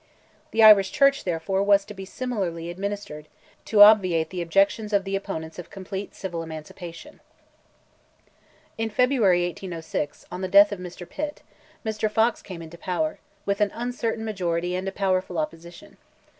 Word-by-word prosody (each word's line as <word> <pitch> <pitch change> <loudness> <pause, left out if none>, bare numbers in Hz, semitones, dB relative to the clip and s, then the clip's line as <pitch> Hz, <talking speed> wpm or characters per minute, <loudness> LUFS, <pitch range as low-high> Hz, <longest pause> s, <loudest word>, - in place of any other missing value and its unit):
The 225 - +3
Irish 205 -3 +8
Church, 275 -2 +3
therefore, 180 +2 -1
was 200 0 +4
to - - -9
be 195 -1 -8
similarly 190 -8 -4
administered, 190 -5 -5 0.4
to 205 -2 +7
obviate 185 -7 +5
the 180 -1 -3
objections 195 +5 +1
of 200 -1 +3
the 195 0 -3
opponents 165 -5 -5
of 175 - -9
complete 195 +1 -7
civil 175 -3 -5
emancipation. 165 +2 -9 1.6
In 225 0 -1
February, 215 -7 +3
1806, 165 -4 -5
on 180 - -5
the 185 - -1
death 200 +2 +7
of 180 -2 -7
Pitt, 295 0 -5 0.4
Mr. 215 0 -1
Fox 225 +2 +1
came 175 -4 -9
into 165 +1 -12
power, 310 - -2 0.3
with 200 +1 -1
an 205 - +3
uncertain 235 -2 -3
majority 180 -4 -2
and 185 +1 -3
a - - -1
powerful 185 -2 -1
opposition. 165 +2 -6
195 Hz, 150 wpm, -25 LUFS, 175-210 Hz, 1.6 s, Irish